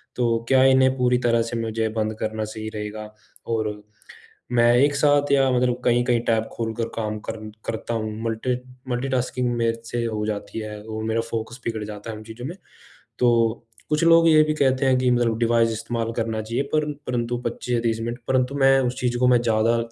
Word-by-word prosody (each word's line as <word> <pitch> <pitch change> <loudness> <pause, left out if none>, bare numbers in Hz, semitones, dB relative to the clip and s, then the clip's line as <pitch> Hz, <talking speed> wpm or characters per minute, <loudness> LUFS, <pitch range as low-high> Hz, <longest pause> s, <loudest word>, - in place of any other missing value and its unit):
तो 120 -2 +1
क्या 130 0 +5
इन्हें 130 0 +5
पूरी 125 -1 +3
तरह 115 -1 +3
से 115 +1 -4
मुझे 110 0 -1
बंद 110 0 0
करना 110 0 -2
सही 110 0 -6
रहेगा? 105 0 -6 0.3
और 110 -2 -2 0.7
मैं 120 -1 +4
एक 140 +3 +3
साथ 145 0 +3
या 135 -1 +4
मतलब 125 0 +1
कहीं-कहीं 120 0 +3
टैब 110 -1 +2
खोलकर 115 0 -3
काम 110 -1 -3
कर 115 - -4 0.3
करता 115 +1 -3
हूँ। 110 -1 -2
मल्टी 115 +2 -1 0.3
मल्टीटास्किंग 125 0 -1
मेरे 115 -1 0
से 120 +1 -2
हो 110 -2 -2
जाती 105 +1 -4
है 105 -1 -6
और 110 0 -5
मेरा 110 +1 0
फ़ोकस 115 +2 -4
बिगड़ 115 -2 -2
जाता 105 +1 -7
है 110 - -7
इन 110 - -10
चीज़ों 115 +2 -9
में। 165 +6 -5 0.6
तो 115 -2 +2 0.2
कुछ 155 +1 +1
लोग 165 0 +6
ये 155 -1 +7
भी 155 0 0
कहते 135 -2 +1
हैं 130 -1 +4
कि 125 0 +2
मतलब 120 -2 +1
डिवाइस 115 -1 +3
इस्तेमाल 115 +1 -3
करना 110 -1 -1
चाहिए 115 +5 -2
पर 150 -1 +1 0.2
परंतु 120 -1 -1
25 120 +1 -3
या - - +1
30 115 -1 0
मिनट 120 +2 -4
परंतु 130 +1 +1
मैं 135 -1 +5
उस 125 0 -2
चीज़ 120 -1 0
को 125 - +4
मैं 125 -1 +4
ज़्यादा 115 0 +2
115 Hz, 200 wpm, -23 LUFS, 110-125 Hz, 0.7 s, ये